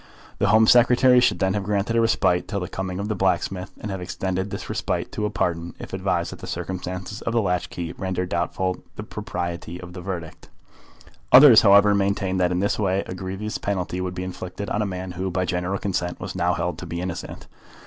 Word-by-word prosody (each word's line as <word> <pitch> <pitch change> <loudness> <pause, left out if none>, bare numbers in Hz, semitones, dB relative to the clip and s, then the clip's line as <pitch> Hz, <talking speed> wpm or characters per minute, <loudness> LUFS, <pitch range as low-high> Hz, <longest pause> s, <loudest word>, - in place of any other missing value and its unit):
The 100 - +2
Home 110 +2 +6
Secretary 125 +2 +6
should 125 - +3
then 95 0 +1
have 105 - -1
granted 105 +3 0
a 115 - +4
respite 90 -5 +2
till 100 - -2
the 90 - -4
coming 95 0 -4
of 100 +1 -3
the 110 - 0
blacksmith, 95 0 0
and 105 - -5
have 95 -1 -4
extended 95 +1 -3
this - - -6
respite - - -2
to 105 - -1
a - - -3
pardon, 85 -4 -2
if - - -9
advised - - -1
that - - -9
the - - -8
circumstances 95 +3 -5
of 115 - -2
the 120 - +3
latch 90 -3 -1
key 85 -1 -5
rendered 90 -1 -3
doubtful 90 +2 -1
the - - -6
propriety 85 -1 -5
of 90 -1 -10
the 90 - -7
verdict. 85 -3 -6 0.8
Others, 130 -3 +10
however, 100 0 +6
maintained 100 -1 0
that 90 -1 +2
in 90 +1 0
this 100 - 0
way 95 -1 +1
a - - -6
grievous 95 +3 -4
penalty 90 -2 -2
would 90 0 -3
be 90 - -3
inflicted 95 +2 -6
on 105 - 0
a 105 - 0
man 90 -1 -5
who, 95 +2 -3
by 90 0 -1
general 90 +2 -1
consent, 90 -3 -2
was 90 +1 -5
now 90 -1 +1
held 90 -2 -2
to 90 - -7
be 85 +1 -4
innocent. 90 -1 -5
95 Hz, 220 wpm, -24 LUFS, 90-100 Hz, 0.8 s, Others